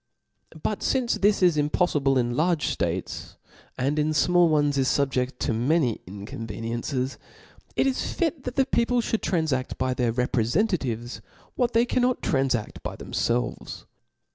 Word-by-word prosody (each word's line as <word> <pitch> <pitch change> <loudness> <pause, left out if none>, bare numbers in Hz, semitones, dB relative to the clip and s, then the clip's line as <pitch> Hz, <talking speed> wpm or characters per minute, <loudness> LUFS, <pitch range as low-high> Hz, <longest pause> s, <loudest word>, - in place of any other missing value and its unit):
But 210 - -1
fince 255 -3 +1
this 205 -1 +3
is 175 -4 +4
Jmpoffiblc 150 -2 +2
in 120 -1 0
large 165 +2 +1
dates, - - -3 0.4
and 140 +4 0
in 150 +1 +2
fmall 175 +2 +4
ones 145 -2 +2
is 130 - +2
fubjeft 130 -3 0
to - - 0
many 125 +1 +1
inconveniencies; 115 +6 -4 0.6
it - - +2
is 265 -1 -1
fit 325 -5 -1
the 260 +1 +1
people 245 -1 +1
(hould 225 -1 -1
tranfadt 160 -8 -1
by 130 0 0
their 125 -2 0
reprcfentatives, 125 - 0 0.3
what 245 -1 0
they 230 +1 +4
cannot 250 0 +1
tranfaft 135 -5 0
by - - -5
themfelves. 120 +1 -2
145 Hz, 140 wpm, -25 LUFS, 125-195 Hz, 0.6 s, is